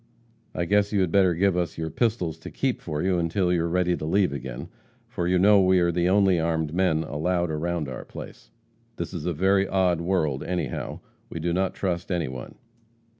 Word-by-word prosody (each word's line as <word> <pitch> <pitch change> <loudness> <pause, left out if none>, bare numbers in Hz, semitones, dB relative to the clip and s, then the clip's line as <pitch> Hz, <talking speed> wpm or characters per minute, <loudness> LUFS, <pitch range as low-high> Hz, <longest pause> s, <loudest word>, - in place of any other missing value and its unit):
I 85 - -1
guess 100 +3 +2
you 100 -2 +2
had 90 -3 0
better 95 -2 +4
give 95 +1 +2
us 90 -1 -2
your 80 -1 -3
pistols 90 -7 -1
to - - -8
keep - - -2
for 75 0 -3
you 90 -1 +1
until 90 +2 +1
you 85 - +1
are 85 - -1
ready 90 0 +1
to - - -7
leave 90 0 +2
again, 65 -3 -6 0.4
for 85 - -3
you 90 +1 +3
know 100 +2 +6
we 95 0 +4
are 85 -1 +2
the 85 +1 +1
only 95 -2 +4
armed 80 -1 -1
men 85 -3 +2
allowed 85 +3 -1
around 80 0 -2
our 65 - -6
place. - - -11 0.5
This - - -5
is 85 -2 -4
a - - +1
very 95 +4 +2
odd 90 -3 +1
world 80 -6 0
anyhow. 85 -8 -3 0.3
We 80 - -6
do 85 +2 -1
not 95 +1 0
trust 90 -1 -2
anyone.' 70 -8 -3
85 Hz, 205 wpm, -25 LUFS, 80-95 Hz, 0.5 s, know